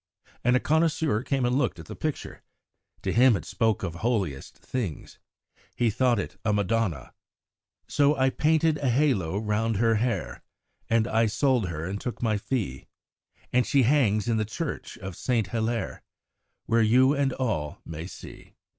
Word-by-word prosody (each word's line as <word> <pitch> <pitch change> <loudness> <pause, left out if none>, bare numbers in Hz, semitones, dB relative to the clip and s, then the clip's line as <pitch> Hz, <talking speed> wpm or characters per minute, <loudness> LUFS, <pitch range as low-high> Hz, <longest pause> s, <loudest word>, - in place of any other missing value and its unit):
And 125 +1 +3
a - - +4
connoisseur 155 -5 +1
came 135 -1 0
and 125 +1 +1
looked 145 - 0
at - - -10
the - - -8
picture. 155 -2 -4 0.6
To - - 0
him 125 -1 +6
it - - -9
spoke 110 -3 0
of 85 - -3
holiest 95 - -2
things; 110 - -5 0.6
he 120 -2 +2
thought 125 +2 +2
it 100 - -4
a 110 - +1
Madonna: 100 - -1 0.7
So 145 0 +3
I 130 0 +3
painted 155 +1 +2
a 140 - 0
halo 120 - +1
round 110 +1 0
her 115 +1 +3
hair, 120 +2 -2 0.5
And 115 0 +2
I 115 -1 +2
sold 120 0 +1
her 80 -1 -4
and 100 +3 -4
took 125 - -5
my 110 -3 0
fee; 100 - -3 0.7
And 125 0 +4
she 135 -2 +3
hangs 115 -5 +2
in 115 -1 +1
the 110 - +1
church 135 +8 -5
of 95 -1 -7
St. 120 -1 0
Hilaire, 115 0 -2 0.6
Where 115 0 +2
you 130 +5 +5
and 140 -2 +1
all 85 - -2
may 80 +1 -6
see. - - -12
115 Hz, 165 wpm, -26 LUFS, 105-130 Hz, 0.7 s, him